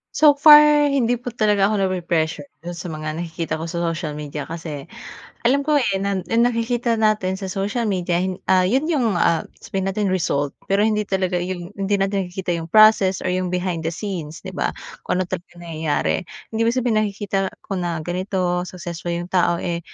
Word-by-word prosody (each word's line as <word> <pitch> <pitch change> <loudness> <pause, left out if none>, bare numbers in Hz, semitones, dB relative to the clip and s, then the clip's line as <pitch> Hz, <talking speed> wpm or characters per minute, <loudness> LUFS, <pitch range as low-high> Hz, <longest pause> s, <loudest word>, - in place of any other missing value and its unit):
So 300 -1 +7
far 295 0 +7
hindi 245 -4 +1
po 245 - -13
talaga 210 -4 +2
ako 215 - 0
nape-pressure 170 -6 -1 0.2
dun 175 - -5
sa 175 +1 -7
mga 155 -1 -5
nakikita 165 -1 -4
ko 165 - -4
sa 170 +1 -3
social 165 -2 -2
media. 150 -1 -6
Kasi 160 -4 -6 0.5
alam 275 +4 +2
ko, 295 -1 +3
eh, 205 -6 +1
na 195 0 -1
yung 230 +1 +3
nakikita 235 -1 0
natin 210 -3 +1
sa 190 - -4
social 205 +5 -2
media, 180 -3 0
hin 185 0 -2
ah, 185 - +4
yun 260 +8 +2
yung, 235 - +1
ah, 170 -2 +1 0.2
sabihin 195 0 -2
natin 195 0 0
result, 145 -6 0 0.2
pero 200 +2 +3
hindi 210 -2 0
talaga 185 -2 0
yung 175 0 -5
hindi 200 +1 +1
natin 195 -1 -1
nakikita 180 0 -3
yung 165 - -7
process 215 -1 +5
or 185 - 0
yung 185 0 -1
behind 180 -2 -2
the - - -3
scenes, 170 -5 -6
'di 190 - -6
ba? - - -1 0.3
Kung - - -2
ano 185 - +1
talaga 180 0 -6
yung 175 - -11
nangyayari, 160 -3 -1 0.4
hindi 220 - -2
ibig 230 +2 +2
sabihin 240 -4 +2
nakikita 200 -2 -1 0.2
ko - - -7
na 175 -1 -2
ganito 180 0 -1
successful 175 -2 -7
yung 175 +1 -6
tao, 175 -2 +3
eh, 170 0 -3
185 Hz, 200 wpm, -21 LUFS, 175-215 Hz, 0.5 s, So